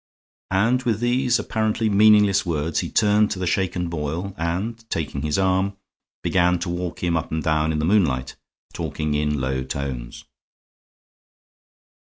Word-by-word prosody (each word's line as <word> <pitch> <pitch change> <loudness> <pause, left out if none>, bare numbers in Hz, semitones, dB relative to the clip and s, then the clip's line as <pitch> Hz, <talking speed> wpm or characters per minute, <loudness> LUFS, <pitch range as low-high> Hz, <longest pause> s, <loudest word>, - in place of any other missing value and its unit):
And 115 +7 +2
with 115 -5 0
these 120 0 +2
apparently 110 0 -1
meaningless 105 -1 +5
words 80 -3 -1
he - - -3
turned 105 -1 +3
to 100 - -3
the 90 - -2
shaken 90 -1 0
Boyle 85 +4 -4
and, 95 +7 -3
taking 70 -3 -3
his 75 0 -1
arm, 95 +1 +1 0.5
began 90 -1 +2
to 85 - -3
walk 90 0 -4
him 85 -1 +1
up 80 +1 -2
and 80 -1 -2
down 80 +1 +1
in 80 - -1
the 75 - 0
moonlight, 80 -10 +1 0.4
talking 75 -1 -3
in 75 0 0
low 65 0 -1
tones. 65 -2 -5
90 Hz, 150 wpm, -23 LUFS, 75-105 Hz, 0.5 s, meaningless